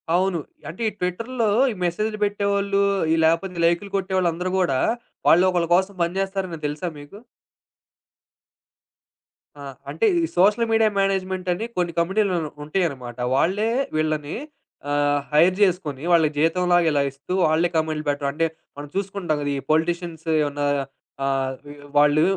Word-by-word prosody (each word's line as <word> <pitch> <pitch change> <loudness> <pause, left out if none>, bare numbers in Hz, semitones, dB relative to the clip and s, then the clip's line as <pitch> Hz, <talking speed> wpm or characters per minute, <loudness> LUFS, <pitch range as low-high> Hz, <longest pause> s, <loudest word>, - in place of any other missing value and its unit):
అవును. 185 -1 +1 0.3
అంటే 180 +8 -9
ఈ - - -10
ట్విట్టర్‌లో 225 +6 -1 0.2
ఈ - - -4
మెసేజులు 215 +5 -1
పెట్టేవొళ్ళు, 200 -1 +1 0.3
ఈ - - +4
లేపోతే 170 +3 +1
లైక్‌లు 175 +4 +1
కొట్టేవాళ్ళందరూ 185 -2 -1
గూడా 135 -8 +1 0.5
వాళ్ళు 175 +3 +6
ఒకళ్ళ 175 -2 0
కోసం 190 +2 +1
పని 170 +2 -2
జేస్తారని 190 -4 -3
తెలుసా 150 +5 -3
మీకు? 145 +9 -12 2.4
ఆ! - - -11 0.3
అంటే 455 - 0 0.2
ఈ - - 0
సోషల్ 210 +5 +4
మీడియా 225 -1 +4
మేనేజ్‌మెంట్ 190 -1 -1
అని 215 +6 -4
కొన్ని 175 -1 0
కంపెనీలు 190 +3 +1 0.3
ఉంటాయన్నమాట. 140 -8 -2 0.2
వాళ్ళే 205 +9 +1 0.3
వీళ్ళని 155 -1 -1 0.5
ఆహ్, 145 0 +1
హైర్ 170 +5 +4
జేసుకొని 170 -8 +1
వాళ్ళకి 160 -3 +4
జీతం 165 +4 +2
లాగా 175 -1 +4
ఇలా 145 -1 +2
ఇస్తూ 140 +6 -7
వాళ్ళే 160 +2 +2
కామెంటులు 155 -1 -1
పెట్టడం. 140 -1 -1
అంటే 165 +2 +1 0.3
మనం 145 0 -7
చూసుకుంటాం 190 -5 -2
కదా 145 0 -1
ఈ - - -2
పొలిటీషియన్స్ 170 0 -1 0.2
ఏమన్నా 145 0 -2 0.6
ఆహ్, 135 -1 -1 0.4
వాళ్ళు 150 +2 +5
175 Hz, 135 wpm, -23 LUFS, 150-195 Hz, 2.4 s, వాళ్ళు